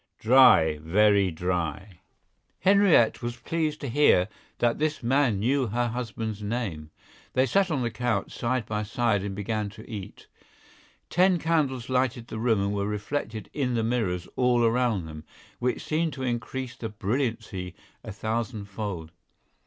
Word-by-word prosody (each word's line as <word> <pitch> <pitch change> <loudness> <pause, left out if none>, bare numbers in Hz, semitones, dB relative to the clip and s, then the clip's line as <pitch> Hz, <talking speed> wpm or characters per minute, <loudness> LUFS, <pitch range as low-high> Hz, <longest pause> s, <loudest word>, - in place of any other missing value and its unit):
"Dry, 110 - +6
very 100 +4 +3
dry." 90 +2 -3 0.6
Henriette 195 - +4
was 120 0 -4
pleased 155 +4 -2
to 140 - -3
hear 115 -8 +4 0.3
that 120 -1 +1
this 155 -3 -1
man 130 -3 +2
knew 130 +5 +1
her 120 +3 0
husband's 115 -3 -4
name. 100 -9 -3 0.4
They 130 - +3
sat 195 +6 +2
on 140 -6 0
the 120 - -1
couch, 120 -5 -1
side 120 -1 -1
by 105 -1 -2
side, 105 -1 0
and 100 0 -4
began 105 +1 -2
to 110 +2 -13
eat. 105 -4 -8 0.9
Ten 180 +1 +4
candles 150 -7 0
lighted 125 -2 0
the 110 - -5
room 110 -4 +2
and 100 +1 -1
were 100 0 -1
reflected 110 +1 -4
in 130 -4 -1
the 115 - +1
mirrors 105 -7 -1
all 125 -1 +3
around 115 -5 +1
them, 75 -1 -9 0.4
which 125 +1 -1
seemed 160 +1 0
to 130 - -6
increase 125 +1 -3
the 115 - -5
brilliancy 105 -4 -3 0.3
a - - -7
thousand 110 +1 -3
fold. 100 -5 -5
115 Hz, 155 wpm, -26 LUFS, 100-130 Hz, 0.9 s, Dry